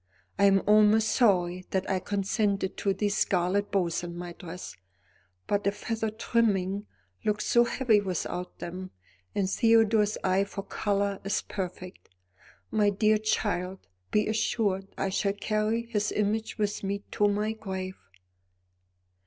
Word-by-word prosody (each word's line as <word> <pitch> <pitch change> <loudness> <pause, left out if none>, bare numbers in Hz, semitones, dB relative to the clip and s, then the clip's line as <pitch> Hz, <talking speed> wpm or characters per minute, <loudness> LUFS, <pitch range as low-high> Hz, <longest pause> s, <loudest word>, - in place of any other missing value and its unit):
I 200 - +6
am 195 -1 +5
almost 215 +1 +5
sorry 185 -6 +2
that 190 -1 -1
I 190 -2 +1
consented 200 0 -1
to 200 - +1
these 205 +1 0
scarlet 190 +1 +1
bows 175 -4 0
on 170 0 -6
my 175 0 -6
dress, 180 +1 -8 0.7
but 205 0 0
the 200 - +2
feather 225 +1 -3
trimming 210 -3 0 0.4
looked 210 0 0
so 240 0 +4
heavy 235 -3 +2
without 180 -1 -4
them, 185 +2 -6 0.5
and 195 -2 +1
Theodore's 220 -1 +3
eye 190 +1 +3
for 200 0 -6
colour 200 -1 -1
is 200 0 -1
perfect. 185 -1 -6 0.6
My 210 -2 +3
dear 215 +2 +3
child, 190 -3 -1 0.2
be 210 0 +2
assured 210 -3 0
I 195 - 0
shall 200 +1 0
carry 215 +2 0
his 210 -3 -1
image 215 +1 -1
with 210 -1 -1
me 200 +1 -2
to 205 - +3
my 210 +1 0
grave." 190 -3 -5
200 Hz, 140 wpm, -28 LUFS, 190-215 Hz, 0.7 s, I